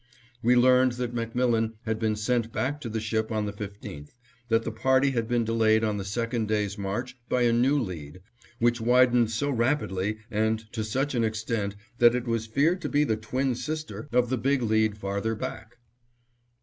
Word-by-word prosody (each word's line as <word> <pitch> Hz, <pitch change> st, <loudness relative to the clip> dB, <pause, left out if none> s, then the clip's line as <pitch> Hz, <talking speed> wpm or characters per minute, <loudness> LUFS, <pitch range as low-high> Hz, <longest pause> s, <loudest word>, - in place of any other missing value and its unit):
We 120 Hz, +2 st, +4 dB
learned 125 Hz, 0 st, +5 dB
that 120 Hz, -1 st, -4 dB
MacMillan 115 Hz, -1 st, 0 dB
had 110 Hz, -1 st, -1 dB
been 110 Hz, -1 st, +1 dB
sent 115 Hz, +1 st, 0 dB
back 145 Hz, +5 st, -2 dB
to 120 Hz, -, -5 dB
the 110 Hz, 0 st, -2 dB
ship 110 Hz, +1 st, -2 dB
on 110 Hz, -1 st, 0 dB
the 105 Hz, -, -4 dB
15th, 100 Hz, -8 st, -8 dB, 0.3 s
that 115 Hz, -1 st, +2 dB
the -, -, -3 dB
party 130 Hz, +5 st, +2 dB
had 115 Hz, -3 st, -1 dB
been 120 Hz, 0 st, +1 dB
delayed 110 Hz, -1 st, +3 dB
on 105 Hz, -1 st, 0 dB
the 100 Hz, -, -3 dB
second 115 Hz, +3 st, -2 dB
day's 105 Hz, -2 st, 0 dB
march 120 Hz, +6 st, -4 dB
by 125 Hz, -, +2 dB
a 120 Hz, -1 st, +3 dB
new 130 Hz, +5 st, +3 dB
lead, 90 Hz, -, -6 dB, 0.4 s
which 120 Hz, 0 st, +1 dB
widened 125 Hz, -1 st, +4 dB
so 140 Hz, +6 st, -1 dB
rapidly 115 Hz, -6 st, 0 dB
and 110 Hz, +1 st, 0 dB
to 110 Hz, -2 st, -2 dB
such 135 Hz, +7 st, -1 dB
an 120 Hz, -2 st, +1 dB
extent 110 Hz, -2 st, -2 dB, 0.2 s
that 120 Hz, 0 st, +6 dB
it 125 Hz, 0 st, -2 dB
was 115 Hz, -2 st, -1 dB
feared 155 Hz, +11 st, +2 dB
to -, -, -3 dB
be 145 Hz, 0 st, +3 dB
the 110 Hz, -7 st, +1 dB
twin 125 Hz, +5 st, -1 dB
sister 155 Hz, +3 st, -5 dB
of 125 Hz, 0 st, +2 dB
the 130 Hz, -, 0 dB
Big 135 Hz, 0 st, +1 dB
Lead 110 Hz, -1 st, +2 dB
farther 100 Hz, +2 st, -2 dB
back. 110 Hz, +2 st, -7 dB
115 Hz, 190 wpm, -27 LUFS, 110-125 Hz, 0.4 s, that